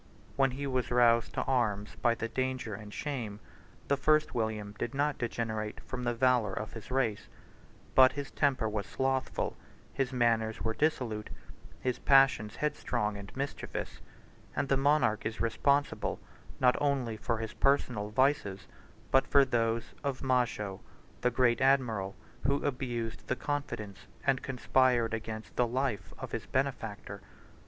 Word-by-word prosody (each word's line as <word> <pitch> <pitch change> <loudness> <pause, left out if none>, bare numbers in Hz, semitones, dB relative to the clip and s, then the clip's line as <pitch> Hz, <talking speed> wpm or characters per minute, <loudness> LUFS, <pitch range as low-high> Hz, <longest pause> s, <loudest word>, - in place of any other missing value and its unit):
When 135 -1 +4
he 135 +3 -4
was 130 -2 -1
roused 120 -2 +4
to - - 0
arms 105 -6 0
by 120 -1 +2
danger 130 0 -2
and 105 +1 -8
shame, 115 -7 -4 0.5
the 140 - +3
first 155 +2 +3
William 110 -3 -2
did 125 - -3
not 145 0 0
degenerate 110 -3 -3
from 125 -1 -5
the 120 - +1
valor 120 -4 +3
of 110 - -5
his 110 -1 -9
race; 125 -5 0 0.7
but 130 0 +7
his 145 -1 -5
temper 135 -6 +1
was 105 -1 -3
slothful; 130 0 -1 0.4
his 135 -2 -1
manners 115 -3 +1
were 110 - 0
dissolute; 115 -7 -1 0.5
his 125 -1 -1
passions 135 -6 +4
headstrong 145 -8 -1
and 100 -1 -8
mischievous; 140 +1 -4 0.5
and 140 - -1
the 135 - +4
monarch 135 -6 +3
is 110 +1 -3
responsible, 140 +5 +1 0.4
not 125 -1 +5
only 135 -6 +1
for 115 +1 -1
his 110 0 -5
personal 125 -6 +1
vices, 115 -5 +1 0.4
but 135 - +4
for 140 -1 +6
those 115 -2 0
of 140 -3 -2
Majo, 120 -7 0 0.4
the 125 - +3
great 120 -1 +2
admiral, 120 -8 +2 0.3
who 140 - +3
abused 120 -5 -3
the 130 - 0
confidence, 120 -9 -4 0.2
and 135 -1 +2
conspired 125 -2 +2
against 110 0 -5
the 125 - +3
life, 120 -6 -2
of - - -7
his - - -4
benefactor. 115 -7 -2
125 Hz, 145 wpm, -31 LUFS, 110-135 Hz, 0.7 s, but